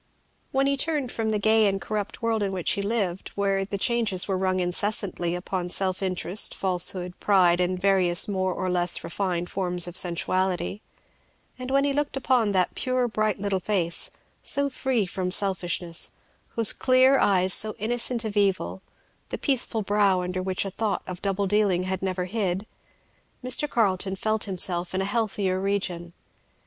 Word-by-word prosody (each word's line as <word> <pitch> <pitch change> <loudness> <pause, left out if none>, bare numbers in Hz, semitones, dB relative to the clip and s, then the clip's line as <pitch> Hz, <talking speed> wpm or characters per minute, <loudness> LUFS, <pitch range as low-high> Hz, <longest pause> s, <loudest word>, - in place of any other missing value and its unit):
When 270 0 +1
he 280 0 +2
turned 290 -3 -1
from 225 -1 -2
the 215 - +1
gay 220 +1 +3
and 195 0 0
corrupt 210 +2 -5
world 225 -1 0
in 200 -1 -1
which 185 -3 0
he 200 - 0
lived, 200 -4 -2
where 195 -1 0
the 200 +1 -4
changes 220 -4 +1
were 195 - 0
rung 185 0 0
incessantly 180 -1 -1
upon 180 0 -4
self 185 +1 -1
interest, 185 +1 +2
falsehood, 180 -1 +1
pride, 180 -4 +3
and 180 +1 0
the - - -11
various 185 -3 +3
more 190 -2 -1
or 185 +1 -3
less 180 -1 +1
refined 175 0 -3
forms 180 -2 +1
of 175 - -8
sensuality, 185 +3 0 0.8
and 255 0 -6
when 275 +1 +2
he 280 0 +1
looked 290 -1 -2
upon 250 -5 +2
that 185 -2 +1
pure 255 -1 0
bright 215 -2 -1
little 195 -1 -1
face, 180 -4 0 0.3
so 280 0 0
free 255 -5 0
from 180 0 -3
selfishness, 180 -3 0 0.5
those 225 -2 +5
clear 260 +1 +4
eyes 185 -2 +3
so 215 0 0
innocent 235 +2 0
of 215 -1 -4
evil, 195 -2 0 0.5
the - - -4
peaceful 245 -5 0
brow 200 -2 +2
under 180 +1 -3
which 185 +1 -1
a 195 - -4
thought 210 0 -2
of 180 -1 -7
double 200 0 -1
dealing 195 -2 +1
had 190 0 -3
never 185 -1 -2
hid, 190 -1 -2 0.8
Mr. 255 +4 +1
Carleton 195 -5 +1
felt 215 +2 -1
himself 180 -2 0
in 190 - 0
a - - -1
healthier 200 -3 -1
region. 185 -3 -2
195 Hz, 170 wpm, -25 LUFS, 185-220 Hz, 0.8 s, those